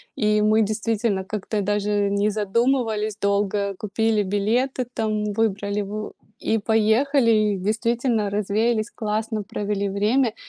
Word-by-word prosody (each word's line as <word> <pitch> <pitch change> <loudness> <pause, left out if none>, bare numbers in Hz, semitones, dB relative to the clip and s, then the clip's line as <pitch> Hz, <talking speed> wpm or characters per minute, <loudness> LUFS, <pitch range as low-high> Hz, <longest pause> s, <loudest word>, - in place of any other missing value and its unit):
И 210 -1 +2
мы 215 +1 +4
действительно 215 -1 -1
как-то 210 +1 -3
даже 205 0 0
не 200 +1 +1
задумывались 220 0 0
долго, 200 0 0
купили 215 +1 0
билеты, 235 +6 0
там, 215 -1 -1
выбрали 205 -1 0
в 210 +1 -5 0.3
и 225 - 0
поехали. 225 +4 +2
И 215 -2 +2
действительно, 225 +2 0
развеялись, 215 +3 0
классно 215 0 -2
провели 200 0 -2
время. 215 +5 +1
215 Hz, 120 wpm, -23 LUFS, 205-225 Hz, 0.3 s, мы